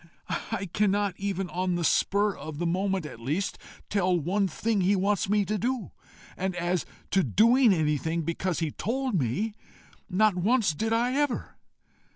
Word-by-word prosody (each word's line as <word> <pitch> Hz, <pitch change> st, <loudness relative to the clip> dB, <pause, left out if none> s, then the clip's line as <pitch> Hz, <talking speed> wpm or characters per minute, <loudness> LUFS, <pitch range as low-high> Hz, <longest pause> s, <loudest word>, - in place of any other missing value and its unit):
I 210 Hz, -3 st, -2 dB
cannot 205 Hz, -1 st, +2 dB
even, 195 Hz, -1 st, -2 dB
on 180 Hz, 0 st, 0 dB
the 175 Hz, -, -1 dB
spur 200 Hz, +4 st, +2 dB
of 155 Hz, -2 st, -7 dB
the 175 Hz, -, -2 dB
moment 190 Hz, 0 st, 0 dB
at 135 Hz, -, -8 dB
least, 150 Hz, +12 st, -2 dB, 0.3 s
tell 185 Hz, -3 st, +2 dB
one 195 Hz, +6 st, +1 dB
thing 210 Hz, +4 st, 0 dB
he 190 Hz, +3 st, +3 dB
wants 195 Hz, 0 st, +1 dB
me 205 Hz, -1 st, +3 dB
to 210 Hz, +2 st, -1 dB
do; 245 Hz, -1 st, -2 dB, 0.4 s
and 190 Hz, 0 st, -2 dB
as 175 Hz, 0 st, -1 dB, 0.2 s
to 195 Hz, -, +4 dB
doing 230 Hz, -, +5 dB
anything 160 Hz, 0 st, 0 dB
because 170 Hz, +1 st, -2 dB
he 160 Hz, -2 st, 0 dB
told 255 Hz, -, -2 dB
me 175 Hz, -, -1 dB, 0.6 s
not 210 Hz, +2 st, +3 dB
once 210 Hz, +2 st, +2 dB
did 220 Hz, +8 st, -2 dB
I 240 Hz, +2 st, +2 dB
ever! 285 Hz, -2 st, -1 dB
195 Hz, 165 wpm, -27 LUFS, 175-215 Hz, 0.6 s, doing